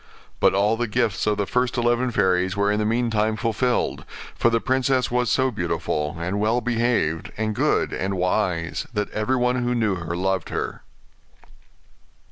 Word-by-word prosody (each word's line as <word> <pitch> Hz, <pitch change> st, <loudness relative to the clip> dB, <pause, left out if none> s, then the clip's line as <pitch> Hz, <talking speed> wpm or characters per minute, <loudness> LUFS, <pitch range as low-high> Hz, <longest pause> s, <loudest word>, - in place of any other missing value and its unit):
But -, -, +4 dB
all 105 Hz, +3 st, +2 dB
the 120 Hz, 0 st, -1 dB
gifts 110 Hz, -3 st, 0 dB
of 105 Hz, -1 st, +2 dB
the 100 Hz, -, 0 dB
first 125 Hz, +3 st, 0 dB
eleven 120 Hz, +1 st, +2 dB
fairies 95 Hz, -3 st, +1 dB
were 100 Hz, 0 st, +2 dB
in 105 Hz, -, 0 dB
the 105 Hz, -, 0 dB
meantime 110 Hz, -2 st, +1 dB
fulfilled; 115 Hz, +3 st, 0 dB, 0.3 s
for 115 Hz, -, +2 dB
the 115 Hz, 0 st, +2 dB
princess 130 Hz, 0 st, +1 dB
was 125 Hz, -1 st, +1 dB
so 130 Hz, +1 st, +2 dB
beautiful, 80 Hz, -6 st, -2 dB
and 90 Hz, +4 st, -2 dB
well 110 Hz, +3 st, +2 dB
behaved, 115 Hz, -9 st, 0 dB
and 110 Hz, 0 st, -1 dB
good, -, -, +1 dB
and 95 Hz, +1 st, -2 dB
wise, 90 Hz, -2 st, -1 dB
that 105 Hz, 0 st, -1 dB
everyone 125 Hz, +3 st, +1 dB
who 120 Hz, 0 st, 0 dB
knew 110 Hz, -4 st, +1 dB
her 85 Hz, -1 st, -4 dB
loved 95 Hz, -1 st, -1 dB
her. -, -, -4 dB
110 Hz, 165 wpm, -23 LUFS, 95-120 Hz, 0.3 s, But